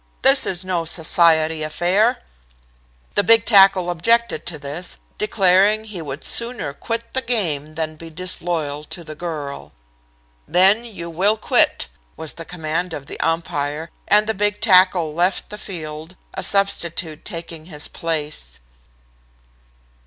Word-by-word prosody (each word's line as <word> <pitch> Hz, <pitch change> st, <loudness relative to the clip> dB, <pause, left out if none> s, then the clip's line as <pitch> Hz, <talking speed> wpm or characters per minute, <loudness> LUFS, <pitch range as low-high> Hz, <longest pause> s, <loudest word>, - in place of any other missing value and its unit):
'This 270 Hz, +1 st, +5 dB
is 185 Hz, 0 st, -2 dB
no 180 Hz, -3 st, -1 dB
society 160 Hz, -1 st, +3 dB
affair.' 180 Hz, +10 st, +1 dB, 0.9 s
"The -, -, +3 dB
big 225 Hz, +2 st, +5 dB
tackle 195 Hz, -4 st, +5 dB
objected 230 Hz, +7 st, +1 dB
to 165 Hz, -, 0 dB
this, 145 Hz, +5 st, -5 dB, 0.2 s
declaring 205 Hz, +1 st, +3 dB
he 210 Hz, -5 st, -7 dB
would 145 Hz, -1 st, -7 dB
sooner 235 Hz, -, 0 dB
quit 230 Hz, +8 st, -5 dB
the 260 Hz, -, 0 dB
game 155 Hz, -, -1 dB
than 155 Hz, -1 st, -4 dB
be 165 Hz, +1 st, -10 dB
disloyal 165 Hz, -3 st, -2 dB
to 170 Hz, +2 st, -7 dB
the 155 Hz, -1 st, -8 dB
girl. 145 Hz, -, -6 dB, 0.7 s
"'Then 195 Hz, +5 st, +4 dB
you 195 Hz, -7 st, -7 dB
will 200 Hz, +6 st, +2 dB
quit,' -, -, +2 dB, 0.3 s
was 160 Hz, -2 st, -5 dB
the 165 Hz, -, -10 dB
command 165 Hz, +1 st, -3 dB
of 140 Hz, -, -8 dB
the -, -, -7 dB
umpire, 160 Hz, -1 st, -2 dB, 0.2 s
and 210 Hz, +1 st, +4 dB
the 220 Hz, -, -1 dB
big 205 Hz, 0 st, 0 dB
tackle 180 Hz, -4 st, +4 dB
left 180 Hz, +5 st, 0 dB
the 210 Hz, -, -6 dB
field, 160 Hz, -2 st, -6 dB, 0.2 s
a -, -, -4 dB
substitute 170 Hz, -5 st, 0 dB
taking 165 Hz, -2 st, -7 dB
his 150 Hz, -3 st, -1 dB
place." 150 Hz, -, -4 dB
175 Hz, 140 wpm, -20 LUFS, 155-200 Hz, 0.9 s, This